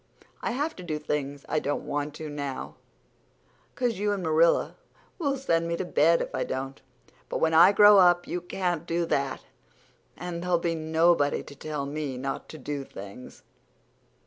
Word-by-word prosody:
I 235 - -2
have 295 +5 -2
to 180 - -8
do 155 -3 -3
things 145 -2 -3
I 155 - +1
don't 145 -1 -3
want 145 0 -3
to 155 - -6
now 145 -2 -5 1.0
'cause 240 -5 -1
you 205 0 +1
and 195 -2 -3
Marilla'll 160 +1 +3 0.6
send 165 -11 0
me 170 0 -1
to 185 - -3
bed 165 0 +3
if - - -8
I - - -1
don't. 135 +1 -5 0.5
But - - -2
when 160 0 +1
I 165 +4 +8
grow 205 0 +8
up 175 -1 +5
you 175 - -3
can't 175 -2 -2
do 170 0 0
that, 140 -4 -1 0.8
and 175 -1 -5
there'll 180 0 +2
be 170 0 -1
nobody 160 -1 +2
to - - -12
tell 150 -1 -4
me 145 -2 -4
not 135 +1 -4
to 155 - -9
do 145 0 -4
things. 100 +1 -11
160 Hz, 170 wpm, -27 LUFS, 145-175 Hz, 1.0 s, I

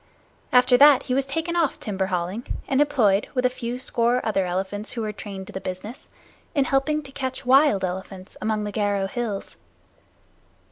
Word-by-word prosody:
After 250 0 +5
that 285 0 +7
he 250 - -2
was 270 +1 +1
taken 325 +5 -2
off 330 -5 +1
timber 190 -2 -2
hauling, 185 +5 -3 0.2
and 275 +1 +2
employed, 230 -9 +2
with 250 0 +1
a 250 - +3
few 240 0 -4
score 245 -1 +1
other 195 -4 0
elephants 190 +4 -3
who 230 - -3
were 215 - -2
trained 195 -2 -7
to - - -12
the 190 - -5
business, 185 +6 -7 0.5
in 280 -2 +3
helping 300 +3 +1
to 270 - -12
catch 260 -1 -5
wild 260 -6 +4
elephants 185 +1 -7
among 215 -1 -1
the 205 0 -5
Garo 205 -2 0
hills. 215 -2 -4
230 Hz, 180 wpm, -24 LUFS, 195-265 Hz, 0.5 s, that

